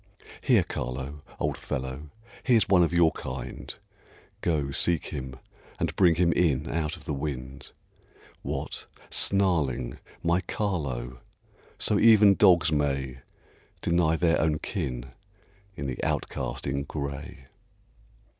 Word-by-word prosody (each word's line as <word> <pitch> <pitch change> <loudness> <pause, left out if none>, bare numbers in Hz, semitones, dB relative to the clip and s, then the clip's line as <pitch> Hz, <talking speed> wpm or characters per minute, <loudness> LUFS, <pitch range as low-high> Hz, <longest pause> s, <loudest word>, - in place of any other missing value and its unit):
Here, - - +4
Carlo, 70 +4 -5 0.2
old - - -1
fellow, 65 +3 -5 0.3
he's 120 -4 +4
one 95 -3 +5
of 85 - +3
your 85 -2 +4
kind, 65 -1 -6 0.7
Go, 75 -5 0
seek 85 +3 +2
him, 65 -1 -5 0.4
and - - -1
bring 90 -4 +5
him 85 0 +3
in 75 -4 +1
out 80 -2 -2
of - - -14
the - - -2
wind. 70 -1 -5 0.7
What! - - -4 0.2
snarling, 75 -11 +2 0.2
my 85 +2 +2
Carlo! 70 - -3 0.6
So 105 - +2
even 105 -3 +7
dogs 90 -6 +5
may 70 -3 -1 0.6
Deny 85 -1 +2
their 85 0 +2
own 75 -1 +2
kin 60 -3 -4 0.6
in 70 - -5
the 65 -2 -4
outcast - - -2
in 70 0 -1
gray. 70 +2 -6
75 Hz, 120 wpm, -27 LUFS, 65-85 Hz, 0.7 s, even